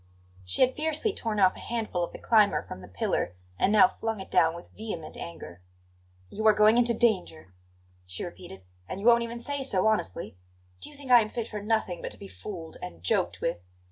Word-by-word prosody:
She 90 Hz, -, +3 dB
had 255 Hz, 0 st, +2 dB
fiercely 315 Hz, +7 st, -1 dB
torn 220 Hz, -, -2 dB
off 185 Hz, -1 st, +4 dB
a -, -, -11 dB
handful 220 Hz, -7 st, -2 dB
of 170 Hz, -, -4 dB
the -, -, -9 dB
climber 215 Hz, -3 st, +3 dB
from 90 Hz, -, -9 dB
the -, -, -11 dB
pillar, 90 Hz, -1 st, -2 dB, 0.2 s
and 195 Hz, -, +3 dB
now 215 Hz, +3 st, +7 dB
flung 225 Hz, -3 st, -4 dB
it 190 Hz, -, -9 dB
down 160 Hz, 0 st, +3 dB
with 170 Hz, -, -11 dB
vehement 210 Hz, -8 st, -6 dB
anger. 90 Hz, -, -9 dB, 0.7 s
"You 220 Hz, +1 st, 0 dB
are 215 Hz, -, +7 dB
going 215 Hz, +2 st, +5 dB
into 235 Hz, -1 st, +4 dB
danger," 180 Hz, -, 0 dB, 0.5 s
she 90 Hz, 0 st, -3 dB
repeated; 95 Hz, +1 st, -10 dB, 0.3 s
"and 190 Hz, -, -5 dB
you 200 Hz, -, -6 dB
won't 235 Hz, 0 st, +6 dB
even 235 Hz, 0 st, -4 dB
say 285 Hz, +3 st, -3 dB
so 200 Hz, -8 st, +1 dB
honestly! 110 Hz, -, -1 dB, 0.4 s
Do -, -, -7 dB
you 295 Hz, -, -13 dB
think 275 Hz, -2 st, -7 dB
I 240 Hz, -1 st, +9 dB
am 215 Hz, -, -3 dB
fit 230 Hz, 0 st, -4 dB
for 210 Hz, -1 st, -6 dB
nothing 210 Hz, -5 st, -1 dB
but -, -, -4 dB
to -, -, -10 dB
be -, -, -10 dB
fooled 160 Hz, -, -8 dB
and 85 Hz, 0 st, -8 dB
joked 90 Hz, -, 0 dB
with? 90 Hz, +1 st, -3 dB
210 Hz, 215 wpm, -28 LUFS, 160-235 Hz, 0.7 s, I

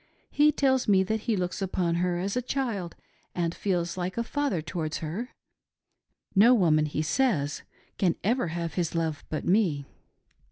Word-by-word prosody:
He 300 Hz, +1 st, +5 dB
tells 265 Hz, -3 st, +2 dB
me 195 Hz, -2 st, +5 dB
that 220 Hz, +3 st, -1 dB
he 225 Hz, -, +3 dB
looks 180 Hz, +2 st, -2 dB
upon 180 Hz, -3 st, 0 dB
her 175 Hz, 0 st, 0 dB
as 195 Hz, +3 st, -2 dB
a 250 Hz, -, +1 dB
child 230 Hz, -9 st, -3 dB, 0.4 s
and 170 Hz, -1 st, 0 dB
feels 175 Hz, -3 st, -1 dB
like 180 Hz, +3 st, -3 dB
a 235 Hz, -, +1 dB
father 285 Hz, -, -1 dB
towards 155 Hz, 0 st, -3 dB
her; 185 Hz, +11 st, -4 dB, 1.0 s
no 230 Hz, +5 st, +7 dB
woman, 155 Hz, -7 st, +3 dB
he 150 Hz, +1 st, -2 dB
says, 160 Hz, -, 0 dB, 0.4 s
can 180 Hz, -4 st, +2 dB
ever 235 Hz, +1 st, +1 dB
have 165 Hz, -1 st, -3 dB
his 170 Hz, -2 st, -2 dB
love 160 Hz, -3 st, -1 dB
but 155 Hz, -, -3 dB
me. 175 Hz, -8 st, +2 dB
180 Hz, 165 wpm, -27 LUFS, 165-225 Hz, 1.0 s, no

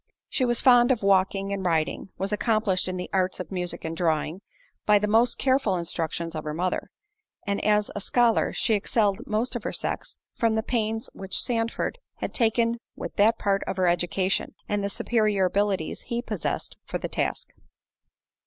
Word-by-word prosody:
She 255 Hz, -, +1 dB
was 240 Hz, -1 st, +1 dB
fond 245 Hz, -2 st, +6 dB
of 240 Hz, -5 st, 0 dB
walking 195 Hz, 0 st, +2 dB
and 195 Hz, -1 st, -3 dB
riding—was 180 Hz, +4 st, -1 dB
accomplished 210 Hz, -4 st, +1 dB
in 185 Hz, 0 st, -3 dB
the 180 Hz, -, -4 dB
arts 185 Hz, -1 st, +1 dB
of 180 Hz, -, -6 dB
music 180 Hz, -3 st, -3 dB
and 165 Hz, 0 st, -3 dB
drawing, 160 Hz, +1 st, 0 dB, 0.4 s
by 210 Hz, 0 st, +5 dB
the 205 Hz, -, +1 dB
most 225 Hz, +3 st, +3 dB
careful 260 Hz, -7 st, +2 dB
instructions 170 Hz, -1 st, -3 dB
of 155 Hz, -1 st, -4 dB
her 150 Hz, 0 st, -4 dB
mother—and 200 Hz, -, -4 dB
as 210 Hz, 0 st, +2 dB
a 205 Hz, -, -3 dB
scholar, 235 Hz, +2 st, +3 dB
she 225 Hz, -, +1 dB
excelled 205 Hz, 0 st, +1 dB
most 220 Hz, +4 st, 0 dB
of 240 Hz, -, -2 dB
her -, -, -2 dB
sex, -, -, -3 dB, 0.2 s
from 230 Hz, -2 st, +1 dB
the 220 Hz, -, 0 dB
pains 225 Hz, -2 st, -1 dB
which 190 Hz, -1 st, -4 dB
Sandford 230 Hz, -, -1 dB, 0.2 s
had -, -, -5 dB
taken 230 Hz, 0 st, +2 dB, 0.2 s
with -, -, -6 dB
that 220 Hz, +2 st, +5 dB
part 195 Hz, -1 st, +1 dB
of -, -, -3 dB
her 185 Hz, -, +2 dB
education, 175 Hz, +2 st, 0 dB
and 205 Hz, -1 st, -1 dB
the 200 Hz, -, 0 dB
superior 210 Hz, -2 st, +1 dB
abilities 195 Hz, -3 st, 0 dB
he 235 Hz, 0 st, -3 dB
possessed 215 Hz, -8 st, -3 dB
for -, -, -2 dB
the -, -, -4 dB
task. -, -, -2 dB
205 Hz, 175 wpm, -26 LUFS, 185-230 Hz, 0.4 s, fond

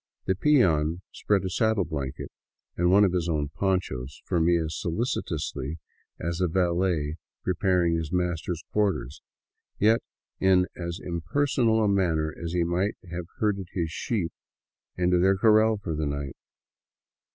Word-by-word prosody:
The 95 Hz, -, +2 dB
peon 90 Hz, -, +2 dB
spread 100 Hz, -2 st, 0 dB
a -, -, -1 dB
saddle 110 Hz, -1 st, +2 dB
blanket 70 Hz, -4 st, -5 dB, 0.4 s
and 90 Hz, 0 st, +2 dB
one 100 Hz, +3 st, +6 dB
of 95 Hz, -3 st, +3 dB
his 85 Hz, -2 st, 0 dB
own 75 Hz, -3 st, 0 dB
ponchos 75 Hz, -8 st, -2 dB
for 90 Hz, -, 0 dB
me 85 Hz, +1 st, +4 dB
as 80 Hz, -2 st, -2 dB
solicitously 80 Hz, -, -2 dB, 0.4 s
as 85 Hz, +2 st, -3 dB
a 90 Hz, -, +3 dB
valet 85 Hz, -3 st, 0 dB, 0.3 s
pre 95 Hz, -, +1 dB
paring 90 Hz, -2 st, +2 dB
his 80 Hz, -1 st, -2 dB
master's 90 Hz, -2 st, -1 dB
quarters; 95 Hz, -11 st, 0 dB, 0.6 s
yet 110 Hz, +3 st, +4 dB, 0.4 s
in 95 Hz, -1 st, +4 dB
as 85 Hz, -1 st, -5 dB
impersonal 110 Hz, -, +1 dB
a -, -, +3 dB
manner 85 Hz, -6 st, +1 dB
as 85 Hz, -1 st, -5 dB
he 90 Hz, -1 st, +2 dB
might 90 Hz, +4 st, 0 dB, 0.2 s
have 90 Hz, 0 st, -4 dB
herded 100 Hz, -4 st, 0 dB
his 85 Hz, -3 st, -2 dB
sheep 95 Hz, -2 st, -2 dB, 0.6 s
into 90 Hz, 0 st, +3 dB
their 95 Hz, +2 st, +4 dB
corral 110 Hz, +1 st, +4 dB
for 95 Hz, -5 st, -4 dB
the 75 Hz, -1 st, -1 dB
night. 70 Hz, -2 st, -4 dB
90 Hz, 150 wpm, -27 LUFS, 80-95 Hz, 0.6 s, one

